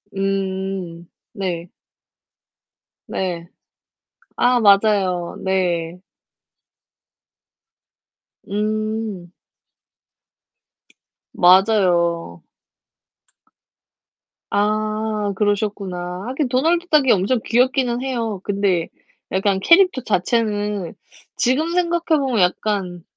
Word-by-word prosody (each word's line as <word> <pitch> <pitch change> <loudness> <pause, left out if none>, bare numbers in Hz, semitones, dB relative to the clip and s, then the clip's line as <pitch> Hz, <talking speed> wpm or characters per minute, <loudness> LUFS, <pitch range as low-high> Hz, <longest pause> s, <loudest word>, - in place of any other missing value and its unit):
음 190 -3 -3 0.3
네. 180 -5 -4 1.4
네. 175 -3 -3 0.9
아 245 0 +3
맞아요. 200 -4 +3
네. 180 -2 -1 2.5
음. 215 -3 -3 2.0
맞아요. 175 - +3 2.1
아. 215 0 -1
그러셨구나. 200 -3 -2
하긴 265 0 -2
도널드 330 +7 +1
덕이 295 -6 +4
엄청 205 +6 +2
귀엽기는 250 0 +1
해요. 230 -7 -3
근데 195 -4 0 0.4
약간 190 +1 +1
캐릭터 350 - +4
자체는 205 -2 -1 0.4
지금 285 +7 +1
생각해 340 -3 +1
보면 260 -5 0
약간 180 -1 -1
205 Hz, 135 characters per minute, -20 LUFS, 185-235 Hz, 2.5 s, 덕이